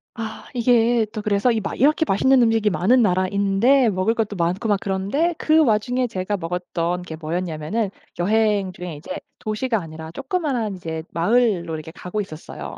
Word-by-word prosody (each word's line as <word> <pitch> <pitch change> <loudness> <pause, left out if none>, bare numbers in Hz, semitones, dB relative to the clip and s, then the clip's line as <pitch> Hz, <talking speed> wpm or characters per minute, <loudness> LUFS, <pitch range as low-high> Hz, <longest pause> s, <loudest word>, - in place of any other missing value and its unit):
아, 225 -1 -6
이게 235 -1 +3
또 215 - -4
그래서 205 +4 +2
이 225 - +1
막 200 - -5
이렇게 300 +4 +4
맛있는 260 +7 +4
음식이 225 -2 +3
많은 240 +8 +3
나라인데 200 +7 +3
먹을 185 +3 +1
것도 215 -2 -1
많고 180 +6 -1
막 205 -2 +2
그런데 200 - 0
그 315 +1 +3
와중에 245 +1 +1
제가 200 -1 -2
먹었던 175 0 -2
게 160 -2 -7
뭐였냐면은 170 +5 -2 0.3
여행 205 0 +2
중에 175 -3 -7
이제 150 - -10 0.3
도시가 220 +1 -1
아니라 160 -1 -8
조그마한 265 - -2
이제 160 -3 -5
마을로 180 -3 +1
이렇게 155 +1 -8
가고 180 +4 -5
있었어요. 155 -5 -8
205 Hz, 370 characters per minute, -22 LUFS, 180-235 Hz, 0.3 s, 이렇게